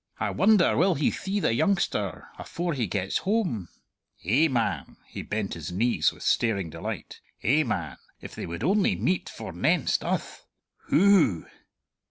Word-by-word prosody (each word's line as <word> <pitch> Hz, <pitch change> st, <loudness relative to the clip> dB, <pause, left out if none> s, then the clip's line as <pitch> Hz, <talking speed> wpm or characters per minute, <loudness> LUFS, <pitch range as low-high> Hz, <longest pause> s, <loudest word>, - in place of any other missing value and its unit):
"I -, -, -1 dB
wonder 205 Hz, -3 st, +4 dB
will 185 Hz, +1 st, +3 dB
he 140 Hz, -, +1 dB
thee 195 Hz, +2 st, -3 dB
the 115 Hz, -, +1 dB
youngster 115 Hz, -, 0 dB
afore 175 Hz, 0 st, -3 dB
he 125 Hz, -6 st, -1 dB
gets 95 Hz, +1 st, -1 dB
hame! 185 Hz, -, -1 dB, 0.6 s
Eh, 130 Hz, -, +4 dB
man" 110 Hz, -, -2 dB
he -, -, -8 dB
bent 105 Hz, -2 st, -3 dB
his 85 Hz, 0 st, -6 dB
knees 115 Hz, +7 st, +2 dB
with -, -, -12 dB
staring 100 Hz, -8 st, +1 dB
delight 80 Hz, +1 st, -6 dB, 0.2 s
"eh, 140 Hz, +7 st, +3 dB
man, 85 Hz, -, -3 dB, 0.2 s
if -, -, -10 dB
they -, -, -6 dB
would 85 Hz, +6 st, -6 dB
only 195 Hz, +5 st, +2 dB
meet 185 Hz, 0 st, -1 dB
forenenst -, -, 0 dB
uth! -, -, -4 dB, 0.4 s
Hoo!" 175 Hz, -, +4 dB
120 Hz, 150 wpm, -26 LUFS, -, 0.6 s, wonder